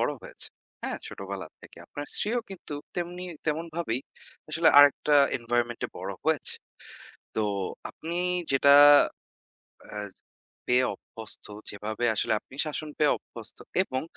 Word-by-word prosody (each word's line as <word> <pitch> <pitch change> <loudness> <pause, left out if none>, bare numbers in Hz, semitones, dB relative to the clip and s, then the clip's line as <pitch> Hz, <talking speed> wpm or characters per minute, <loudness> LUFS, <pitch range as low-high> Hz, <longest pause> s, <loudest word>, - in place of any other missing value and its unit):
বড় - - +1
হয়েছেন। - - -8 0.3
হ্যাঁ, - - -2
ছোটবেলা 100 0 -6 0.2
থেকে - - -14
আপনার 145 0 -7
স্ত্রীও 235 +4 +2
কিন্ত 195 - -10 0.3
তেমনি 175 +1 -3 0.2
তেমনভাবেই 160 -5 -1 0.5
আসলে 160 +1 +4
আরেকটা 145 +1 +6 0.2
environment-এ 120 0 -1
বড় 95 +2 -4
হয়েছে। 160 -3 +1 0.8
তো 110 - +1 0.5
আপনি 170 +2 -5 0.3
যেটা, 140 +1 +6 1.1
অ্যাঁ 105 -1 -6 0.6
পেয়ে 125 +1 +4
অভ্যস্ত, 110 -1 -9 0.2
যেভাবে 105 +3 -3
আসলে 110 - +2
আপনি 130 - -16
শাসন 155 0 -3
পেয়ে 150 -1 +4
অভ্যস্ত 115 -1 -10 0.3
এবং 130 -8 -3
135 Hz, 120 wpm, -28 LUFS, 115-160 Hz, 1.1 s, আরেকটা